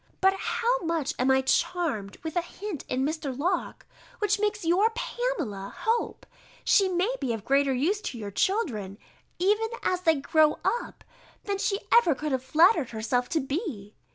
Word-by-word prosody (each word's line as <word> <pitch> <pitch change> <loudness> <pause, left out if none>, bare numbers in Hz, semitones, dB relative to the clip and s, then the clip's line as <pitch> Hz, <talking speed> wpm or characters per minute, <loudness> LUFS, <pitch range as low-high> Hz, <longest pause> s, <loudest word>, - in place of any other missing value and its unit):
But 385 0 +4
how 475 +5 0
much 330 -4 -1
I - - +1
am 265 +1 +3
charmed 265 - 0
with 320 0 -5
a 350 - +2
hint 360 -1 -7
in 260 +1 0
Mr. 300 -4 -3
Locke, 350 +5 -2 0.3
which 420 -1 +1
makes 420 -2 -1
your 370 +7 +4
Pamela 480 - -3
hope, 460 +1 -1 0.4
she 390 -2 +4
may 370 +6 0
be 255 -4 -1
of 220 -3 -6
greater 275 0 +3
use 325 +12 0
to 245 - -8
your 205 -3 -6
children, 215 - -1 0.4
even 420 +5 +2 0.2
as 365 -1 0
they 325 -3 +4
grow 300 +2 +3
up, 480 - -2 0.4
than 400 -1 -2
she 395 0 0
could 460 - -17 0.3
ever 300 +3 -3
have 260 -1 -1
flattered 320 - +4
herself 240 +3 -1
to 320 - +1
be. 270 - -4
325 Hz, 170 wpm, -27 LUFS, 260-400 Hz, 0.4 s, But